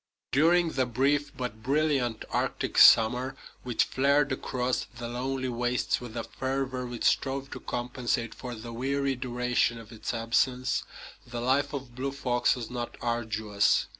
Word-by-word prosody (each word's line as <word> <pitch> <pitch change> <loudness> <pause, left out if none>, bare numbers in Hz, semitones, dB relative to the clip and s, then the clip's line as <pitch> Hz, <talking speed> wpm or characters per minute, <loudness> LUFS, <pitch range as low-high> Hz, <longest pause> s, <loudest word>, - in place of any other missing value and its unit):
During 165 +4 +4
the 130 -3 0
brief 140 +4 +1
but 125 -4 -4
brilliant 135 -3 +1
Arctic - - 0
summer, 125 +4 +6 0.3
which 125 -2 +1
flared 140 +2 +2
across 125 -1 -1
the 120 0 -5
lonely 130 +2 -2
wastes 120 +1 0
with 120 -1 -7
a 115 - -2
fervor 130 -1 -3
which 120 -2 -6
strove 135 0 +1
to - - -6
compensate 120 -1 -2
for 125 -2 -7
the 115 +1 -8
weary 135 +3 0
duration 125 -1 0
of 115 -2 -11
its 110 - -4
absence, 125 +3 +1 0.4
the 120 -1 -5
life 135 +4 +1
of 135 -4 -6
Blue 135 +3 -3
Fox 125 -3 +1
was 120 -2 -6
not 120 -1 -5
arduous. 110 -3 +1
125 Hz, 150 wpm, -28 LUFS, 120-135 Hz, 0.4 s, summer